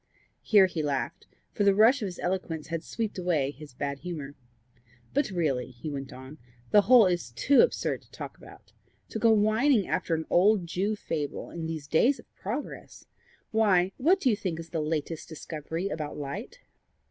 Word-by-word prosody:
Here 205 -4 +6
he 175 -3 -2
laughed, 145 -2 -3 0.2
for - - -1
the 200 -1 +5
rush 235 +5 +5
of 205 - -1
his 180 - -7
eloquence 175 -4 -3
had 165 -1 -3
swept 220 -4 -4
away 160 -7 +1
his 150 -3 -13
bad 140 +1 -3
humour. 150 -5 -6 0.8
"But 285 -2 +1
really," 155 -9 -1
he 125 +5 -7
went 135 -2 -6
on, 130 +4 -11 0.3
"the 210 - +7
whole 230 +2 +7
is 175 -9 -1
TOO 265 - +5
absurd 480 - 0
to - - -25
talk - - -8
about. - - -16 0.4
To 220 - -4
go 230 - +4
whining 220 +2 +3
after 165 - 0
an 160 0 -3
old 195 +1 +4
Jew 195 +6 -1
fable 150 -7 -4
in 165 -1 -5
these 160 -3 -5
days 240 - +3
of - - -15
progress! 240 +9 -6 0.5
Why, 195 -5 +3
what 355 +9 +3
do 260 - +3
you - - +2
think 185 -5 -4
is 165 0 -9
the 165 - -1
last 155 +1 -3
discovery 160 +3 -5
about 155 -5 -5
light?" 200 - -6
175 Hz, 180 wpm, -28 LUFS, 155-215 Hz, 0.8 s, the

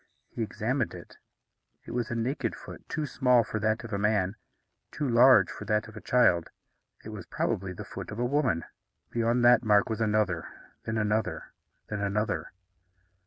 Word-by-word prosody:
He - - -5
examined 115 +4 -1
it. - - -12 0.7
It - - -8
was 120 -1 -2
a 120 - -2
naked 120 +5 -2
foot; - - -12
too 155 -1 -2
small 125 -3 +3
for 110 0 -4
that 110 +2 0
of 115 -2 -7
a 100 - 0
man, 105 -2 +1 0.5
too 150 - -3
large 120 -5 +6
for - - -8
that 105 0 0
of 110 - -13
a 110 - -8
child. 90 -9 +3 0.6
It - - -6
was - - -8
probably 95 0 -2
the 90 - -8
foot - - -8
of 105 - -6
a 120 - 0
woman. 125 - +1 0.5
Beyond 120 +1 +1
that 125 +1 +7
mark 105 -2 +4
was 110 - -2
another, 105 -6 +1 0.4
then 110 0 -2
another, 105 0 -1 0.3
then 105 - -4
another. 100 -5 -1
110 Hz, 175 wpm, -28 LUFS, 105-120 Hz, 0.7 s, that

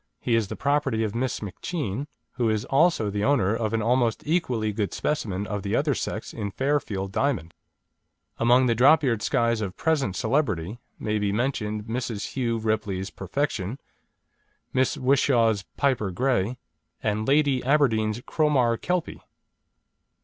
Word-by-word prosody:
He 120 - -1
is 115 -3 +2
the - - -5
property 140 -5 +1
of 105 -2 -2
Miss 125 +2 -2
McCheane, 130 - -4 0.2
who 120 -3 0
is 110 -1 0
also 135 - +2
the 100 0 -2
owner 115 -7 +2
of 110 -2 -1
an 115 -1 0
almost 120 -1 +1
equally 125 -10 0
good 100 -1 -2
specimen 105 -10 -2
of 105 -1 -3
the 100 +2 -1
other 145 0 +2
sex 110 -2 -4
in 105 -3 -3
Fairfield 105 -6 -1
Diamond. 100 - -1 0.9
Among 120 +2 +5
the 120 - +3
drop 145 +7 +5
eared 115 -5 +1
Skyes 115 -1 +1
of 95 -3 -4
present 145 - 0
celebrity 115 - -1 0.2
may 105 0 -1
be 100 -1 0
mentioned 110 -2 -1
Mrs. 115 -1 -3
Hugh 120 -3 0
Ripley's 105 -3 -2
Perfection, 125 -6 -3 1.0
Miss 130 0 +1
Whishaw's 120 -6 +2
Piper 130 -8 +1
Grey, 125 +2 0 0.5
and 105 0 -1
Lady 140 -2 +3
Aberdeen's 120 -6 +2
Cromar 130 -6 +2
Kelpie. 180 +4 -2
115 Hz, 145 wpm, -25 LUFS, 105-135 Hz, 1.0 s, Among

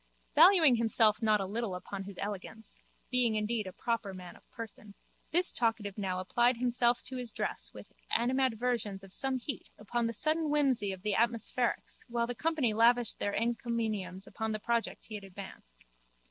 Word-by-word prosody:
Valuing 325 -10 +7
himself 225 -1 +3
not 215 -2 +3
a 195 - -1
little 210 0 -3
upon 195 +1 -6
his 195 -2 -9
elegance, 205 +2 -6 0.4
being 245 -3 +3
indeed 215 -1 -1
a - - -5
proper 220 -2 -2
man 180 -1 -9
of - - -21
person, 215 -2 -9 0.3
this 355 +3 +3
talkative 225 -4 0
now 190 -3 -2
applied 240 +6 +2
himself 245 0 +2
to 260 - -4
his 250 -2 -5
dress - - -4
with - - -12 0.2
animadversions 240 -4 0
of 195 -1 -11
some 270 -1 0
heat 255 0 -6
upon 230 +2 -1
the 230 - -3
sudden 310 +6 +1
whimsy 265 -9 +2
of 190 -1 -8
the 210 -1 0
atmospherics 235 +2 0
while 235 -1 0
the 245 - -3
company 290 -3 +1
lavished 235 +1 +3
their 200 - -1
encomiums 225 -5 -2
upon 220 -1 -3
the 215 - -2
project 235 +1 -1
he 220 - -10
had 205 -2 -6
advanced. 190 - -11
230 Hz, 175 wpm, -31 LUFS, 205-245 Hz, 0.4 s, Valuing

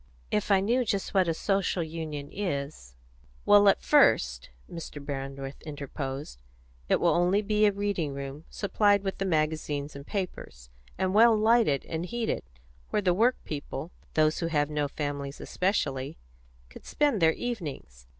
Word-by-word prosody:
"If 210 0 0
I 195 -2 +5
knew 240 +6 +2
just 200 -4 -2
what 190 -3 +3
a 165 - +1
Social 195 -1 0
Union 155 -3 -6
is 140 - -4 0.2
" 65 0 -30
"Well, 205 0 +7
at - - +2
first," 65 - +3 0.2
Mr. 165 -3 -8
Brandreth 135 -1 -6
interposed, 140 - -6 0.5
"it - - +3
will 170 -2 +3
only 180 +5 +2
be 210 0 +3
a - - +4
reading 200 -6 -2
room, 140 +2 -7
supplied 200 0 +2
with 195 -1 -3
the 195 - 0
magazines 155 -3 -1
and 140 - -8
papers, 60 - -5 0.3
and 185 0 0
well 225 +1 +6
lighted 220 - +3
and 165 +2 -4
heated, 235 0 -2 0.5
where 210 - 0
the 180 -2 +3
work 235 +7 +3
people 150 +1 -5 0.2
those 155 0 +3
who 165 - -1
have 150 -2 0
no 150 -1 0
families 140 -1 -4
especially 140 -9 -1 0.5
could - - -13
spend 290 - +1
their 160 0 +5
evenings. 145 - -6
165 Hz, 160 wpm, -28 LUFS, 140-200 Hz, 0.5 s, Well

